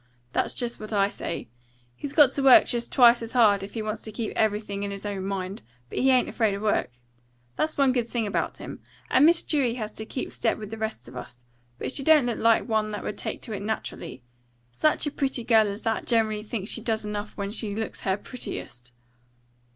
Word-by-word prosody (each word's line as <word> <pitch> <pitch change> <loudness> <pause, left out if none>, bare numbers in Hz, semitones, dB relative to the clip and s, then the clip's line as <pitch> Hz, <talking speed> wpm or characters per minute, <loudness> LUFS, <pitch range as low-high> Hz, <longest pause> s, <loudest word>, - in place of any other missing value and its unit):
That's - - 0
just 240 -1 -2
what 215 0 -8
I 200 -1 +3
say. 170 - -5 0.5
He's 280 - -6
got 290 -4 +6
to 275 - -2
work 270 -2 +8
just 235 -1 -2
twice 240 -2 +6
as 230 0 -7
hard, 210 -5 +5
if 195 +3 -8
he 220 - -2
wants 215 0 -4
to 220 - -8
keep 220 +1 -4
everything 210 -2 0
in 200 - -2
his 200 +1 -6
own 200 -2 -3
mind. 195 0 -4 0.3
But - - -3
he 265 - +4
ain't 255 -1 +4
afraid 220 -4 0
of 200 - -6
work. 215 - +1 0.7
That's 310 0 -1
one 275 -2 +4
good 245 -2 0
thing 230 -2 -1
about 205 - -2
him. - - -8 0.3
And 275 +4 +6
Miss 335 0 +4
Dewey 265 -6 +1
has 215 -3 -4
to 220 - -6
keep 260 - -4
step 225 - 0
with 210 -1 -8
the 225 - -5
rest 220 - -4
of 125 - -12
us. 120 -1 -9 0.3
But - - -3
she 275 - +1
don't 300 -2 +5
look 240 -2 -2
like 230 +1 +3
one 220 -2 +1
that 210 -1 -5
would 210 - -4
take - - -5
to 220 - -4
it 200 - -4
naturally. 185 - -5 0.5
Such 305 - +2
a 295 - -1
pretty 270 -4 -1
girl 225 -2 +4
as 200 +2 -5
that 225 -1 -1
generally 220 -3 +2
thinks 210 -1 -3
she 235 - -2
does 220 -1 -1
enough 210 0 -5
when 200 0 -3
she 210 -2 -2
looks 220 0 -4
her 190 -1 0
prettiest." 125 - -7
220 Hz, 230 wpm, -26 LUFS, 205-245 Hz, 0.7 s, work